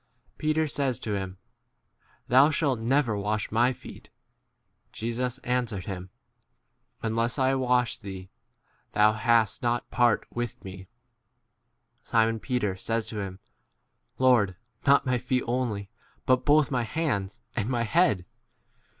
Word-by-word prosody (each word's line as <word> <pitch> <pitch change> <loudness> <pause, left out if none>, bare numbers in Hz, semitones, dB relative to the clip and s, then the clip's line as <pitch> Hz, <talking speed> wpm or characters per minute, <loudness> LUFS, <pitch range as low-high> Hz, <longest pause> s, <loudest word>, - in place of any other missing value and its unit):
Peter 155 +1 +1
says 135 -4 -1
to 105 - -4
him, 95 -1 -4 0.9
Thou 130 +4 +6
shalt 145 -6 +1
never 120 0 +1
wash 105 +1 -2
my 120 +3 +3
feet. 125 - -11 0.8
Jesus 120 +2 -3
answered 120 -6 -1
him, 95 -2 -6 0.9
Unless 115 +2 0
I 130 -1 +3
wash 125 -2 +1
thee, 95 -3 -8 0.6
thou 105 +1 +5
hast 115 -1 +2
not 120 0 0
part 120 -3 +3
9 - - -21
with 120 -1 -4
me. 95 0 -9 1.2
Simon 115 -1 +2
Peter 110 -6 -1
says 115 +3 -1
to 110 - -5
him, 95 -2 -5 0.8
Lord, 120 -8 +4 0.3
not 140 +1 +5
my 125 -1 +1
feet 125 +1 0
only, 115 -5 -2 0.3
but 130 0 +2
both 150 -1 +4
my 125 -2 +1
hands 115 -7 -2
and 115 -1 -1
my 120 -2 0
head. 115 - +2
120 Hz, 130 wpm, -27 LUFS, 105-130 Hz, 1.2 s, Thou